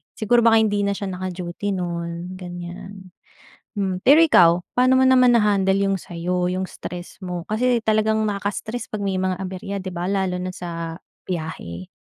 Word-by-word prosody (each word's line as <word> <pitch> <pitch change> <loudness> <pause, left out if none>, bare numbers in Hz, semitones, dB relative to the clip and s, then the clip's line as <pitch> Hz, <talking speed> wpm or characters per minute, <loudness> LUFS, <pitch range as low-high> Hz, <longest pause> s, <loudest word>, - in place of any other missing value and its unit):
Siguro 235 +2 +3
baka 225 -1 +6
hindi 205 -2 +1
na 200 - +1
siya 200 - -4
naka-duty 180 +1 -4
no'n, 170 0 -4
ganiyan. 180 +1 -9 0.7
Hmm. 190 -2 -1
Pero 285 +4 +8
ikaw, 180 - +7 0.2
paano 255 +1 +4
mo 260 - +5
naman 255 -2 +6
na-handle 200 -3 +3
'yong 195 -1 +1
sa 175 - -11
'yo, 180 +1 0
'yong 185 +1 -2
stress 175 0 -8
mo? 180 -1 -5
Kasi 240 +2 +2
talagang 220 0 +2
nakaka-stress 210 +3 -3
'pag 210 -1 -4
may 195 -1 -1
mga 185 -1 -1
aberya, 190 +2 -5
'di 185 - -5
ba, 175 +1 -3
lalo 190 -2 0
na 185 - -3
sa 165 -2 -6 0.3
biyahe? 155 - -5
190 Hz, 170 wpm, -22 LUFS, 175-215 Hz, 0.7 s, Pero